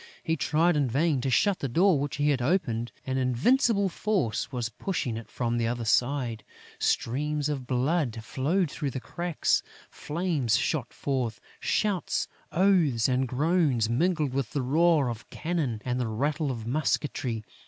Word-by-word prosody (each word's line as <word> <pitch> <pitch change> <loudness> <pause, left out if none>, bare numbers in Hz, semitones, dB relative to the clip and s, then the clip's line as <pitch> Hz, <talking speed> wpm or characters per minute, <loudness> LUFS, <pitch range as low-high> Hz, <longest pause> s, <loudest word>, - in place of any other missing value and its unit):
He 160 - 0
tried 165 +2 +2
in 145 -3 +2
vain 145 +2 +1
to 135 - -1
shut 185 - +2
the 140 - -2
door 170 +4 +4
which 145 0 -2
he 145 +1 +2
had 130 -3 0
opened: 120 -6 0
an 130 0 -1
invincible 200 - +3
force 185 - -1
was 120 -3 -2
pushing 125 - -3
it 110 -2 -7
from 120 -1 -1
the 115 - +1
other 120 0 -2
side, 120 0 +1 0.4
streams 150 +4 0
of 135 -4 -3
blood 130 0 0
flowed 150 +7 0
through 145 -3 -3
the 130 - -4
cracks; 170 +5 0 0.3
flames 150 - 0
shot 135 -7 -1
forth; 125 -5 -2 0.2
shouts, 205 -5 0 0.2
oaths 170 - +3
and 130 0 +1
groans 140 -4 +2
mingled 155 0 +1
with 135 -4 -2
the 140 - 0
roar 155 +1 +3
of 115 -2 -6
cannon 155 -9 -2
and 125 0 -1
the 125 - 0
rattle 145 +7 -1
of 115 -4 -4
musketry. 130 -3 -1
140 Hz, 160 wpm, -27 LUFS, 120-165 Hz, 0.4 s, door